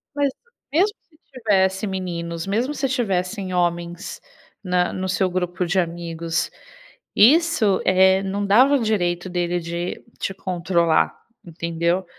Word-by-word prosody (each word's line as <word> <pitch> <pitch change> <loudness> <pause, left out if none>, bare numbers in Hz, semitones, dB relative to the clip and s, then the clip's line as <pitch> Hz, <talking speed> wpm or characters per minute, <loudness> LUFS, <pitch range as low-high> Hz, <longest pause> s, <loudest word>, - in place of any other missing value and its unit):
Mas 285 -2 +1 0.4
mesmo 390 +7 +2
se 310 - -26 0.2
tivesse 200 -4 +1
meninos, 170 -3 -4
mesmo 235 +8 0
se 275 -2 -1
tivessem 195 -5 -1
homens 175 0 -2 0.4
na 180 -1 +1
no 185 0 -3
seu 185 0 +1
grupo 180 0 -2
de 175 +3 +1
amigos, 165 -1 -2 0.6
isso, 255 - +4
eh, 190 +1 +4
não 200 +1 -2
dava 250 +8 +5
o 260 - +1
direito 180 -4 0
dele 175 0 -1
de 170 +1 -5 0.2
te 195 - -2
controlar, 175 -3 +1 0.3
entendeu? 170 +2 -1
185 Hz, 130 wpm, -22 LUFS, 175-205 Hz, 0.6 s, dava